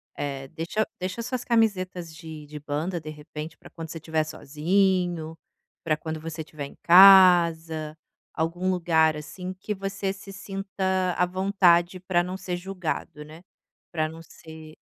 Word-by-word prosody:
eh, 135 -2 -4
deixa 180 +7 -2
deixa 185 +5 -4
as 230 - -3
suas 250 -1 -3
camisetas 185 -8 0
de 155 -1 -9
de 150 +1 -9
banda 155 +4 -3
de 155 - -8
repente 150 +1 -8
para - - -15
quando 165 -2 -8
você 165 - -6
estiver 160 0 -1
sozinho, 165 +2 0 0.5
para 155 -2 +1
quando 160 0 -5
você 160 0 -6
estiver 155 -2 -7
em - - -17
casa, 170 -4 +6 0.4
algum 175 +3 -1
lugar 160 -3 +2
assim 180 +4 -7
que 200 +3 -5
você 195 0 -3
se 195 0 -11
sinta 190 -2 -2
à 180 - +3
vontade 185 -1 +2
para 175 -1 +1
não 180 +1 -5
ser 185 -1 -4
julgado, 175 -4 -5
né, 155 +3 -13 0.5
para 155 -2 0
não 160 +1 -10
ser 160 -1 -13
170 Hz, 155 wpm, -26 LUFS, 155-190 Hz, 0.5 s, casa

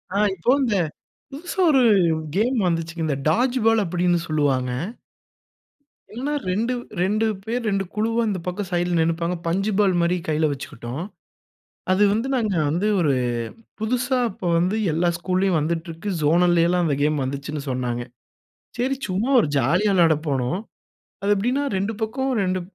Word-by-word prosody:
ஆ, - - +2 0.2
இப்ப 215 +9 +2
இந்த 230 -5 +1 0.6
புதுசா 335 +7 -7
ஒரு 265 -3 +5 0.5
கேம் 245 +4 +2
வந்துச்சுங்க. 165 -1 -2
இந்த 145 - 0
டாட்ஜ் 245 +10 +2
பால் 225 -1 +4
அப்டின்னு 175 -1 +1
சொல்லுவாங்க. 135 -5 +1 1.5
என்னா 275 +5 -2 0.2
2-, 225 +7 0 0.3
2 215 +4 +1 0.2
பேர் 235 +1 -2
2 195 -1 0 0.4
அந்தப் 190 -5 -3
பக்கம் 185 +2 -3
சைடுல 175 0 0
நின்னுப்பாங்க. 165 +2 0
பஞ்சு 195 +5 0
பாலு 195 -3 +3
மாதிரி 170 +1 +2
கையில 155 0 +1
வச்சுக்கிட்டோம். 130 +2 -6 0.9
அது 190 +2 +4
வந்து 225 +5 -1
நாங்க 215 -6 0
வந்து 175 +7 0
ஒரு 150 -5 +2 0.7
புதுசா 245 +4 0
அப்ப 190 - -11
வந்து 185 +5 +1 0.2
எல்லா 175 +2 +1
ஸ்கூல்லயும் 185 -1 +1
வந்துட்ருக்கு. 165 +3 -3
ஜோனல்லைலாம் 175 +2 +3
அந்த 150 -4 +1
கேம் 150 -1 +1
வந்துச்சுன்னு 140 +2 -4
சொன்னாங்க. 125 -1 -2 0.8
சரி, 260 +3 +1
சும்மா 200 +8 -1
ஒரு 180 - 0
ஜாலியா 170 - +2
விளையாடப் 165 -4 +3
போனோம். 135 +3 0 0.6
அது 200 +1 +2
,எப்படின்னா 245 +8 0
2 200 +4 -1
பக்கம் 265 +5 -1
2 185 0 0
180 Hz, 140 wpm, -23 LUFS, 160-215 Hz, 1.5 s, ஒரு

